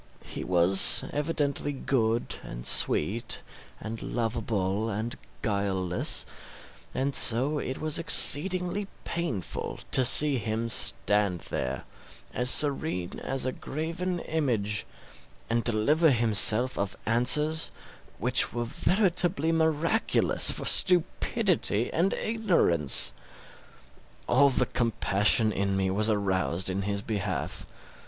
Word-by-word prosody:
He - - -7
was 90 +2 +2
evidently 145 -1 -2
good, 120 -4 -2
and - - -10
sweet, 110 +9 0 0.4
and 110 +1 -7
lovable, 110 -3 -3
and 110 +3 -4 0.3
guileless; 95 -4 0 0.7
and 135 +1 -3
so 135 +7 +5
it 130 - -5
was 155 0 -3
exceedingly 180 +4 +2 0.2
painful 150 - -5
to 130 - +6
see 140 +3 +6
him 110 +1 -4
stand 105 -5 +3
there, 65 +1 -4 0.5
as 125 0 0
serene 140 - 0
as 135 -1 -4
a 130 - -1
graven 165 +7 -5
image, 115 -10 -2 0.6
and 115 0 0
deliver 145 +9 +2
himself 115 0 +2
of 100 -1 -4
answers 150 +7 +2 0.5
which 125 +4 +1
were 120 0 -3
veritably 175 - 0
miraculous 160 +6 +1
for - - -3
stupidity 180 - +2
and 175 +4 0
ignorance. 175 - 0 1.1
All 140 +3 +4
the 130 - +1
compassion 110 -1 +1
in 100 -1 -2
me 95 -1 -1
was 105 +3 -1
aroused 95 -3 -1
in 95 +1 -3
his 100 0 -3
behalf. 100 -4 -5
120 Hz, 105 wpm, -26 LUFS, 100-155 Hz, 1.1 s, to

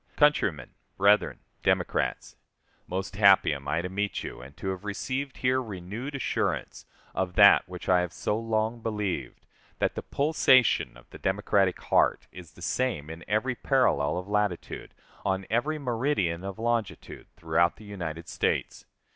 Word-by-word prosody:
Countrymen, 145 - +2 0.3
Brethren, 100 +2 +3 0.2
Democrats: - - 0 0.5
Most 95 +2 -4
happy 100 -6 +6
am 70 -1 -7
I 80 +4 0
to - - -2
meet 100 +2 -2
you, - - -7
and 70 +4 -13
to 95 - -4
have 95 +1 -4
received 130 +6 -3
here 130 +1 +1
renewed 110 +6 -6
assurance 135 - -2 0.3
of 90 -2 -2
that 100 -2 +7
which 90 -1 -8
I 90 -1 +4
have 90 -1 -3
so 105 - -2
long 115 +1 -1
believed 100 - -3 0.3
that - - 0
the - - -4
pulsation 135 - +3
of - - -18
the - - -11
Democratic 95 -1 +1
heart - - +2
is 85 -4 -12
the 90 - -12
same 85 - -1
in 80 +1 -9
every 110 +5 +1
parallel 120 - +1
of 90 +1 -5
latitude, 105 -3 -2 0.3
on 95 -1 -1
every 145 +7 +1
meridian 115 - -1
of 100 +1 -6
longitude, 115 -2 -3
throughout 80 +1 +1
the 110 - -14
United 85 -5 -6
States. - - -2
100 Hz, 155 wpm, -27 LUFS, 90-115 Hz, 0.5 s, that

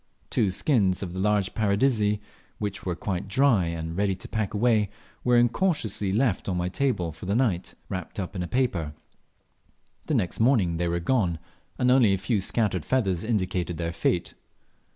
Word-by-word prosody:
Two 105 - +2
skins 100 -3 +1
of 90 -2 -5
the 95 - -4
large 105 -1 +1
Paradisea, 105 0 +2 0.4
which 100 -2 -4
were 90 - 0
quite 95 +1 -3
dry 120 -4 +3
and 80 0 -4
ready 100 0 +1
to - - -10
pack 110 -3 -2
away, 110 -2 +3 0.3
were 125 -1 +4
incautiously 120 - +1
left 110 -2 +1
on 90 - -1
my 90 0 -1
table 95 -7 0
for 85 - -10
the 100 - +1
night, 110 -8 0
wrapped 95 +1 -5
up 95 +1 -4
in 90 - -2
paper. 90 - 0 1.1
The - - +1
next 90 - -1
morning 110 -9 +3
they 85 +1 0
were 85 0 0
gone, 90 -3 +1 0.4
and 125 -1 +3
only 120 -7 +5
a - - -3
few 105 +1 0
scattered 100 -4 0
feathers 95 -10 0
indicated 95 -6 -1
their 85 0 -3
fate. 85 0 0
100 Hz, 175 wpm, -26 LUFS, 90-115 Hz, 1.1 s, only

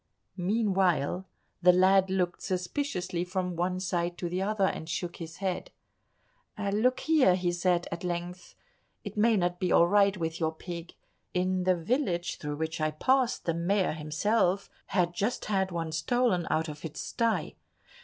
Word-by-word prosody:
Meanwhile 190 -4 +1 0.3
the 180 0 +7
lad 190 +1 +4
looked 180 -2 -1
suspiciously 180 -1 -2
from 180 -1 -2
one 180 +2 -1
side 175 -2 -1
to 175 - -3
the 180 +2 -2
other, 200 0 +1
and 160 -3 -3
shook 175 0 -3
his 165 -1 -8
head. 190 -2 -3 0.9
"Look 215 +5 +1
here," 300 - +4
he 180 -1 0
said 175 0 +1
at 170 +1 -5
length, 175 0 -5 0.5
"it - - -7
may 220 +1 +4
not 175 -1 0
be 180 - 0
all 170 - +6
right 200 0 +4
with 165 -1 -3
your 160 -1 0
pig. 170 0 -8 0.4
In 185 0 +1
the 185 -1 +4
village 175 - -1
through 150 -1 -4
which 160 +1 -3
I 155 - +2
passed, 255 - +1
the 165 - +1
Mayor 185 +4 +1
himself 180 +6 0 0.2
had 175 -3 +1
just 205 +7 -1
had 190 -2 +1
one 165 -2 -3
stolen 225 -1 +1
out 160 +1 +1
of 150 -1 -8
its 160 -3 -6
sty. 230 -2 -1
180 Hz, 165 wpm, -29 LUFS, 170-195 Hz, 0.9 s, the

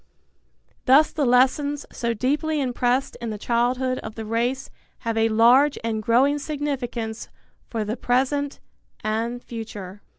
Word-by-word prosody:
Thus 275 +4 +6
the 290 -4 0
lessons, 275 +4 +2
so 235 -1 -2
deeply 295 +7 0
impressed 250 0 0
in 235 - -3
the 215 - -4
childhood 250 +3 0
of 220 0 -8
the 225 - -6
race, 240 +4 -1 0.3
have 230 -1 -2
a 225 0 +3
large 245 +6 +5
and 225 -1 -1
growing 260 +7 +3
significance 260 -7 -4 0.4
for 225 -3 -2
the 215 +2 -2
present 270 +3 0 0.4
and 230 +3 -2
future. 210 -4 -8
245 Hz, 135 wpm, -24 LUFS, 225-270 Hz, 0.4 s, Thus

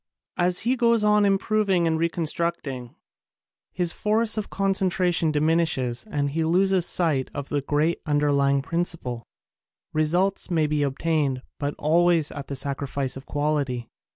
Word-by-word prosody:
As 175 0 +2
he 245 +3 +1
goes 235 -3 +2
on 210 0 +4
improving 195 -2 +2
and 160 -1 +1
reconstructing, 165 -6 -2 0.8
his 175 -2 -1
force 220 +1 +1
of 215 -2 -3
concentration 185 -4 +1
diminishes 155 - 0
and 145 -5 -1
he 160 +2 -1
loses 185 +2 +2
sight 155 -7 +1
of 140 -1 -5
the 145 -1 0
great 150 +4 0
underlying 140 -2 +2
prin 170 +4 -1
ciple. 125 -9 -3 0.7
Results 175 +7 +1
may 160 -3 +2
be 150 0 0
obtained 140 -2 0 0.2
but 145 0 -2
always 165 0 +2
at 140 -1 -7
the 140 - -4
sacrifice 140 -1 -2
of 135 - -10
quality. 145 -5 -1
160 Hz, 140 wpm, -24 LUFS, 140-180 Hz, 0.8 s, on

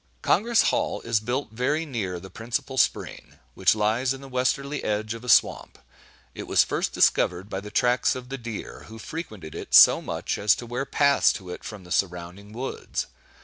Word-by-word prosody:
Congress 225 +2 +3
Hall - - -1
is 115 -1 0
built 120 +2 -3
very 135 +8 -1
near 100 - -4
the 95 +2 -12
principal 130 +4 -4
Spring, 130 - -1 0.2
which 95 +6 +3
lies 115 +5 +1
in 135 - -12
the 135 - -10
westerly 140 +3 -1
edge 110 +1 -2
of 115 +1 -9
a 125 - -6
swamp. - - +3 0.6
It - - -8
was - - +4
first - - -2
discovered 90 +3 +1
by 95 - -2
the 105 +1 -9
tracks 125 +3 +2
of 125 -1 -8
the 135 - -4
deer, 115 -3 -7
who 110 - -11
frequented 110 - -8
it - - -2
so - - +8
much - - -4
as 105 0 +4
to 120 - -8
wear 125 +3 -3
paths 140 0 +3
to 95 -3 -8
it - - -8
from 105 -4 -8
the 90 - -15
surrounding 90 +2 -3
woods. 125 +5 -4
115 Hz, 190 wpm, -25 LUFS, 100-130 Hz, 0.6 s, so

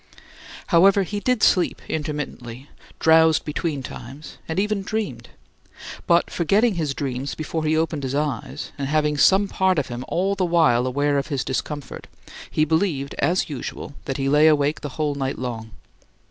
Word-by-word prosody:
However, 195 +3 +6
he 205 +3 -4
did 250 +1 0
sleep 180 - +3
intermittently, 145 -5 -5 0.3
drowsed 160 0 +4
between 150 -2 -3
times, 135 +5 -10
and 160 +3 -1
even 210 0 0
dreamed; 190 - -4 0.8
but, 170 0 +3
forgetting 205 +7 +2
his 155 -6 -2
dreams 135 -1 -3
before 155 +1 -3
he 155 +1 +2
opened 160 -2 -1
his 135 0 -3
eyes, 150 -1 -3
and 135 - -2
having 150 0 +1
some 190 +7 +4
part 190 -2 +1
of 140 -3 -1
him 120 +1 -5
all 190 +3 0
the 195 -1 -1
while 160 -8 +3
aware 145 +2 +1
of 135 - -4
his 140 -4 -2
discomfort, 140 +1 -5 0.4
he 155 - +1
believed, 160 -4 0
as 180 +2 +1
usual, 145 -1 -6
that 135 - -3
he 135 -1 -1
lay 150 +3 +5
awake 150 -1 +2
the 145 - -5
whole 150 -2 0
night 135 -1 -3
long. 115 -3 -5
150 Hz, 165 wpm, -23 LUFS, 140-170 Hz, 0.8 s, However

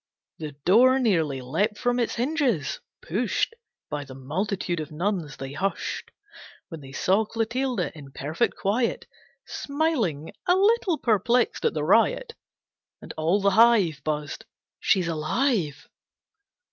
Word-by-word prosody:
The 155 -2 -6
door 250 +8 +6
nearly 165 - +1
leapt 200 - 0
from 245 0 0
its 235 - 0
hinges, 250 - 0 0.2
pushed 230 - -1 0.3
By 150 -1 -4
the 135 -2 -11
multitude 175 +6 -2
of 155 0 -6
nuns. 170 -2 -2
They 135 0 -6
hushed 190 +7 -3 0.6
When 165 -3 -8
they 135 -1 -11
saw 190 +9 +2
Clotilde, 230 +1 -1
in 145 -4 -12
perfect 145 +5 -1
quiet, 230 +5 0 0.4
Smiling, 275 - -1
a 360 - +5
little 395 -3 +3
perplexed 235 +1 +1
at - - +1
the 150 - -1
riot. 230 - +3 0.7
And - - -9
all 165 +6 +1
the 200 0 +3
hive 200 -9 +4
Buzzed 150 -1 -3 0.4
"She's 185 -3 +2
alive!" 165 - -1
195 Hz, 130 wpm, -25 LUFS, 155-240 Hz, 0.7 s, door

